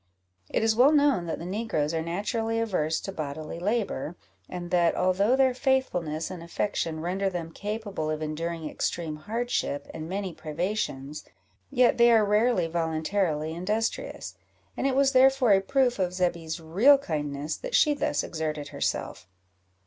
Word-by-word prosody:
It - - 0
is 225 -1 +3
well 255 +5 +6
known 285 - +3
that 165 - -2
the 170 - -7
negroes 180 -6 -1
are 160 - 0
naturally 215 +7 -2
averse 180 -8 0
to 195 - -5
bodily 155 -1 -5
labour, 195 - -1 0.3
and 175 -1 -6
that, 175 -2 +3
although 195 +6 +2
their 265 -1 +3
faithfulness 220 - 0
and 180 -2 -7
affection 170 -2 -2
render 190 +3 -1
them 170 -3 -5
capable 205 -5 -4
of 155 0 -2
enduring 160 +1 -3
extreme 160 0 -3
hardship 210 -6 -2
and 155 +1 -6
many 190 -1 -3
privations, 155 -4 -3 0.5
yet 250 -1 +3
they 235 0 +7
are 220 -2 +5
rarely 210 -2 +2
voluntarily 160 -1 -1
industrious; 210 +6 -2 0.4
and 270 - 0
it 265 - 0
was 275 0 +4
therefore 260 -3 +5
a 195 - +4
proof 255 +1 +1
of 180 -1 0
Zebby's 170 -3 -1
real 200 - +5
kindness, 150 - -3
that - - -4
she 300 - +5
thus 215 - -1
exerted 155 -2 -4
herself. 90 +1 -3
180 Hz, 155 wpm, -27 LUFS, 160-225 Hz, 0.5 s, they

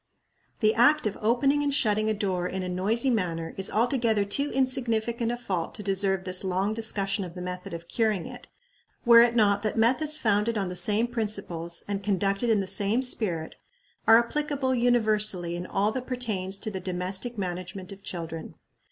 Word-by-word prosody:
The 215 -1 +4
act 290 +5 +4
of 210 - -1
opening 275 +6 +2
and 290 -1 0
shutting 215 -5 +2
a - - +1
door 185 -4 -2
in 190 +1 -4
a - - -4
noisy 210 +8 0
manner 170 -7 -2
is 195 0 0
altogether 230 -3 +1
too 280 +8 +1
insignificant 235 -3 -1
a 240 - -3
fault 185 -8 -4
to 210 - -6
deserve 195 -1 0
this 185 0 +3
long 190 +3 -1
discussion 200 -3 0
of 175 -1 -9
the 180 - -7
method 180 0 -6
of 170 0 -8
curing 215 -5 0
it, - - -10 0.6
were 235 -1 +8
it 235 0 +3
not 205 -3 +3
that 215 +1 -2
methods 280 +7 +3
founded 220 -3 +1
on 195 -3 -2
the 180 - -6
same 215 +4 +2
principles, 200 -8 -2
and 200 -1 -3
conducted 200 +3 0
in 215 -3 +3
the - - -3
same 205 +5 +2
spirit, 180 -10 0 0.5
are 225 - +8
applicable 270 +2 -1
universally 215 -8 +1
in 175 +1 -6
all 205 +2 0
that 255 +2 -5
pertains 210 -7 -1
to 215 +2 -4
the 190 - -5
domestic 185 +6 -3
management 185 0 -5
of 195 0 -11
children. 165 -3 -7
210 Hz, 185 wpm, -26 LUFS, 185-235 Hz, 0.6 s, were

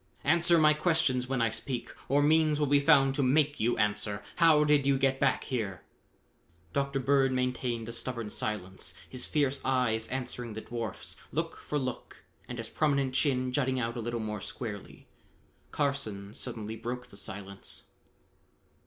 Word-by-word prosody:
"Answer 170 +3 +4
my 155 -1 +6
questions 150 -6 +1
when 130 -3 +1
I 115 - +2
speak, 120 +1 -4 0.2
or 145 +2 +4
means 155 0 +4
will 150 - +3
be 145 0 +4
found 140 -2 +5
to 140 - 0
make 145 +3 +3
you 120 +2 +1
answer. 105 -1 0
How 160 -3 +6
did 145 -2 +3
you 140 -1 +4
get 135 0 +1
back 140 - +2
here?" 105 -8 -3 0.9
Dr. 140 0 0
Bird 135 0 +3
maintained 125 -2 -1
a - - -4
stubborn 115 -2 -4
silence, 95 -3 -3
his 130 -1 -2
fierce 140 -3 +1
eyes 125 -4 +1
answering 125 -3 -4
the 110 - -4
dwarf's, 115 -4 -5
look - - -2
for 150 - -3
look, 130 -3 -5 0.2
and 125 - -6
his 115 -1 -5
prominent 140 -3 +1
chin 130 -2 +1
jutting 130 -1 +1
out 115 -1 -2
a 120 - -3
little 120 +1 -3
more 105 -2 -4
squarely. 105 -4 -7 0.6
Carson 110 -9 -2
suddenly 110 -3 -4
broke 120 +2 -5
the - - -14
silence. 100 0 -5
130 Hz, 160 wpm, -30 LUFS, 115-140 Hz, 0.9 s, my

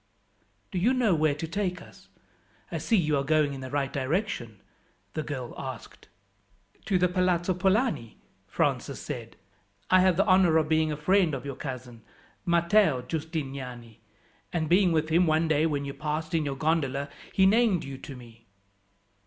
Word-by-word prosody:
"Do 185 - -1
you 240 +8 +3
know 235 -7 +3
where 155 -2 +2
to 160 +2 -5
take 185 +1 -2
us? - - -16 0.6
I - - -2
see 225 - +2
you 155 -5 +2
are 140 - 0
going 150 0 +2
in 135 - -7
the 130 - -6
right 140 -1 -2
direction?" 135 - -2 0.5
the 155 - -2
girl 130 -5 -5
asked. 130 -4 -8 0.8
"To 190 - +2
the 180 0 +3
Palazzo 180 0 +1
Polani," 190 - 0 0.3
Francis - - -1
said. - - -7 0.6
"I 185 - +7
have 185 -2 +3
the 195 - +3
honour 185 -4 +5
of 155 -1 +2
being 155 0 +2
a 150 - -3
friend 175 0 +2
of 130 - -7
your 140 -2 -5
cousin, 125 -4 -7 0.5
Matteo 170 -5 +3
Giustiniani, 135 -6 -5 0.5
and 160 -2 -1
being 180 +2 +4
with 155 -1 +1
him 170 +2 +3
one 160 +1 +2
day 155 0 +2
when 145 -2 -2
you 140 - -5
passed 155 +2 -4
in 160 -2 +1
your 140 -1 -2
gondola, 145 -2 0 0.2
he 190 - +4
named 210 -3 +3
you 135 -1 -7
to 140 - -9
me." 120 -2 -15
155 Hz, 170 wpm, -27 LUFS, 140-180 Hz, 0.8 s, I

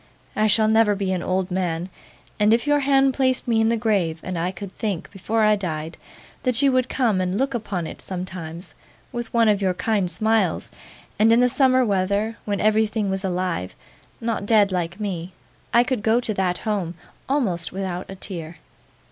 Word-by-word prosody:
I 215 0 +3
shall 215 +1 +4
never 220 -1 +4
be 195 -1 -2
an 185 -2 -1
old 185 +1 -1
man; 175 -2 -1 0.5
and 210 +2 +5
if 235 - -2
your 290 0 +3
hand 270 -1 +3
placed 260 -1 +1
me 225 -2 +3
in 225 - +3
the 230 - +1
grave, 195 -8 0
and 185 - -4
I 170 +2 -1
could 190 +1 -8
think, 200 -6 -3
before 215 +3 -1
I 215 0 +5
died, 165 -5 -4 0.5
that 250 -2 +1
you 275 - +5
would 255 -1 +1
come 225 -8 +1
and 185 +1 -1
look 270 +2 0
upon 200 -7 -3
it - - -8
sometimes 180 -2 -6 0.4
with 240 -2 -5
one 230 -1 +3
of 205 -1 +3
your 185 -2 +1
kind 205 -3 0
smiles, 220 +5 0 0.5
and 220 +1 +5
in 230 - +5
the 250 - +5
summer 260 0 +4
weather, 200 +2 0
when 205 -2 -1
everything 215 -1 +1
was 190 +1 -2
alive 180 - -2 0.4
not 225 -3 -2
dead 210 -3 +4
like 175 +1 -2
me 185 -4 -4 0.4
I 235 - +5
could 245 -3 -2
go 225 +3 +3
to 230 -3 -2
that 185 -2 0
home 195 -6 -2 0.3
almost 195 - 0
without 185 -1 -4
a 195 - -7
tear. 170 -4 -6
205 Hz, 190 wpm, -23 LUFS, 185-225 Hz, 0.5 s, and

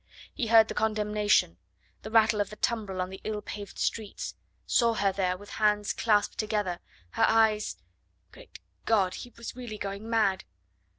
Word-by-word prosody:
He 245 - -2
heard 220 0 +7
the - - -4
condemnation, 210 - +1 0.4
the - - -7
rattle 220 -1 +4
of 205 - -2
the 210 - -9
tumbril 210 -5 -2
on 185 - -7
the 190 - -9
ill 215 -1 -3
paved 205 -1 -8
streets 215 -3 -3 0.3
saw 235 -2 +3
her 200 -2 +2
there 185 -1 -1
with 205 +2 -13
hands 210 -1 +2
clasped 210 -2 +1
together, 210 -5 -1 0.3
her - - +3
eyes 220 - +2 0.5
Great - - -14 0.3
God! 200 -5 +2
he 245 - -8
was 235 0 -7
really 240 -4 -7
going 200 +2 -5
mad! 215 -5 +2
210 Hz, 165 wpm, -28 LUFS, 200-220 Hz, 0.5 s, heard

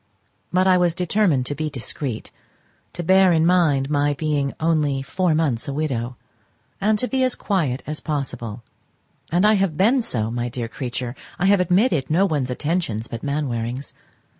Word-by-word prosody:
But 185 +1 +3
I 185 -1 +5
was 175 -2 +2
determined 180 -7 +1
to 145 - -2
be 155 +2 -3
discreet, 130 -2 -5 0.6
to 175 - -4
bear 190 +2 +5
in 160 -1 +3
mind 160 -7 +3
my 145 0 +1
being 145 -2 0
only 150 -4 +1
four 180 +2 0
months 145 -5 0
a 140 - -3
widow, 130 -5 -2 0.7
and 210 +2 +3
to 250 - 0
be 265 0 0
as 255 -1 +2
quiet 155 - -1
as 150 0 -5
possible: 125 -7 -4 0.7
and 175 +4 +3
I 215 - +6
have 190 -6 +1
been 240 +7 +4
so, 115 - -2
my 120 +1 -2
dear 120 -1 -4
creature; 125 +1 -5 0.2
I 195 - 0
have 200 0 +5
admitted 180 - +2
no 175 +6 +3
one's 145 -8 -1
attentions 125 -5 -2
but 115 - -6
Mainwaring's. 130 -3 -3
150 Hz, 170 wpm, -22 LUFS, 130-180 Hz, 0.7 s, I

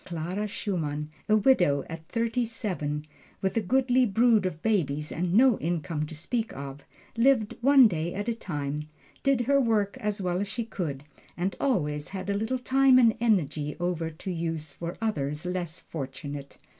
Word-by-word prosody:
Clara 180 +5 -3
Schumann, 155 -8 -3 0.2
a 215 - +6
widow 180 - +4
at 160 0 -8
thirty 230 +1 0
seven, 175 -10 -3 0.3
with 190 -1 -1
a 225 - +2
goodly 255 +4 +3
brood 225 -2 +4
of 160 -2 -7
babies, 150 -9 0
and 175 +1 -1
no 240 +3 +5
income 165 -2 -2
to 160 - -9
speak 225 +8 -2
of, 140 0 -7 0.3
lived 230 -2 +3
one 270 -1 +7
day 170 -3 -2
at 205 +3 -3
a 235 - +1
time, 150 -7 -4 0.3
did 275 -3 +2
her 275 +3 +3
work 215 -5 +1
as 210 0 -1
well 180 -1 -1
as 205 - -2
she 230 +3 -3
could, 155 -11 -4 0.3
and 185 +3 -1
always 150 - 0
had 190 0 -4
a - - 0
little 220 +5 -1
time 265 +1 +4
and 230 -3 +5
energy 155 -10 +1
over 175 -2 -1
to 165 +4 -6
use 165 -3 -3
for 170 +3 -6
others 150 -7 -2
less 180 -3 -3
fortunate. 140 -1 -7
185 Hz, 170 wpm, -27 LUFS, 155-230 Hz, 0.3 s, one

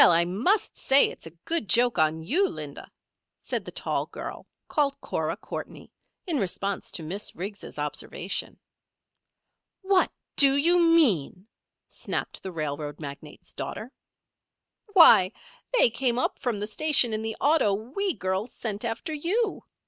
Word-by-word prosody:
I 170 0 +5
must 240 - 0
say 270 +1 +5
it's - - -11
a 165 +1 -14
good 330 - -1
joke 240 +4 +3
on 155 0 +2
you, 355 - +2
Linda," - - -8 0.5
said - - -3
the - - -7
tall - - -2
girl, - - -8 0.2
called 285 -2 0
Cora - - -3
Courtney, - - -8 0.3
in 330 -7 -1
response 195 0 -3
to 165 - -4
Miss 190 +7 -4
Riggs' 200 +1 -7
observation. 150 0 -3 1.3
"What 380 -1 +3 0.3
do 275 -1 +6
you 340 +5 +4
mean?" 230 - +3 0.4
snapped - - -4
the 190 - -6
railroad 150 -2 -5
magnate's 145 0 -9
daughter. 235 +4 -6 1.0
"Why, 220 - +7 0.5
they 240 - +6
came 240 0 0
up 255 - -1
from 245 -6 -2
the 205 - -2
station 245 +1 +3
in 215 - -1
the 220 0 -4
auto 295 -7 +3
we 270 - -2
girls 190 +5 -3
sent 215 -2 -4
after 235 +8 -4
you. 390 +9 -1
225 Hz, 140 wpm, -26 LUFS, 185-300 Hz, 1.3 s, Why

